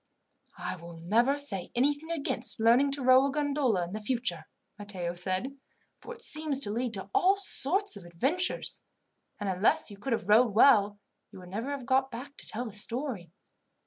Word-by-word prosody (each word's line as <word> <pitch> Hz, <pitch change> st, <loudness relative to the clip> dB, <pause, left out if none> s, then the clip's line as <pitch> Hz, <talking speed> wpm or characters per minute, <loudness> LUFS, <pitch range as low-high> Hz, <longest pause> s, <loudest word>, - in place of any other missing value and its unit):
"I -, -, -4 dB
will 170 Hz, 0 st, -11 dB
never 230 Hz, +12 st, +1 dB
say 200 Hz, -11 st, -2 dB
anything 290 Hz, +5 st, 0 dB
against 320 Hz, -6 st, 0 dB
learning 240 Hz, +5 st, +4 dB
to 275 Hz, -1 st, +2 dB
row 260 Hz, +2 st, +6 dB
a -, -, -2 dB
gondola 280 Hz, -10 st, 0 dB
in 210 Hz, +5 st, -6 dB
future," 210 Hz, -8 st, -2 dB, 0.3 s
Matteo 185 Hz, -4 st, -5 dB
said, 185 Hz, +9 st, -2 dB, 0.4 s
"for -, -, -10 dB
it 465 Hz, -, -13 dB
seems 305 Hz, -, 0 dB
to 205 Hz, -, +2 dB
lead 235 Hz, +1 st, -2 dB
to 195 Hz, 0 st, -8 dB
all 380 Hz, +2 st, +4 dB
sorts 390 Hz, -, +2 dB
of 200 Hz, -, -10 dB
adventures; 270 Hz, -, -1 dB, 0.6 s
and 205 Hz, -, -4 dB
unless 190 Hz, +3 st, +1 dB
you 200 Hz, -, -10 dB
could 245 Hz, +4 st, -2 dB
have 220 Hz, -, -3 dB
rowed 220 Hz, 0 st, +4 dB
well, 210 Hz, -4 st, +5 dB, 0.3 s
you -, -, -12 dB
would 180 Hz, -1 st, -12 dB
never 220 Hz, +8 st, -4 dB
have 280 Hz, -3 st, -5 dB
got 265 Hz, +1 st, +2 dB
back 265 Hz, +3 st, -9 dB
to -, -, -9 dB
tell 240 Hz, +3 st, -4 dB
the 220 Hz, -, -8 dB
story. 230 Hz, -, -3 dB
240 Hz, 180 wpm, -29 LUFS, 200-280 Hz, 0.6 s, row